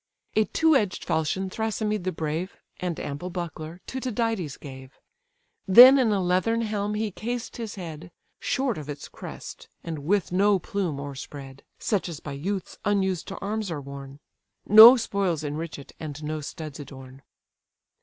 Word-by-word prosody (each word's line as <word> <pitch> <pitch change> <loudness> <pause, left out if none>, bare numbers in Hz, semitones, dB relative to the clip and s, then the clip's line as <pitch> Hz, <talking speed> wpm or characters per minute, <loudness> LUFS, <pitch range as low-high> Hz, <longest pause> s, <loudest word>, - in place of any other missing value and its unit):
A 215 - +4
two 320 +5 +3
edged 205 -8 0
falchion 160 +5 0
Thrasymed 215 -2 -2
the 185 - 0
brave, 160 +4 -4 0.2
And 180 -3 -3
ample 145 +6 -5
buckler, 170 -1 -6
to 260 - -5
Tydides 225 - -2
gave: 130 -1 -11 0.7
Then 250 +8 +10
in 235 -4 +3
a 205 - +2
leathern 185 +6 +1
helm 210 -1 -2
he 215 0 -1
cased 240 +5 -5
his 225 -3 -5
head, 170 -3 -8 0.3
Short 260 - -1
of 150 -1 -9
its 145 -1 -6
crest, - - -10
and 160 -2 -5
with 180 +7 0
no 200 +2 +4
plume 180 -4 -3
o'erspread: 140 -1 -8 0.2
(Such 200 -5 -1
as 160 -3 -6
by 145 - -7
youths 185 +7 -4
unused 190 -4 0
to 195 - -6
arms 210 0 -2
are 160 -3 -3
worn:) 140 0 -9 0.5
No 220 +5 +11
spoils 195 -8 -1
enrich 155 +2 -4
it, 140 - -12
and 155 -1 -7
no 155 0 -3
studs 155 0 -7
adorn. 135 -1 -11
180 Hz, 160 wpm, -26 LUFS, 150-210 Hz, 0.7 s, No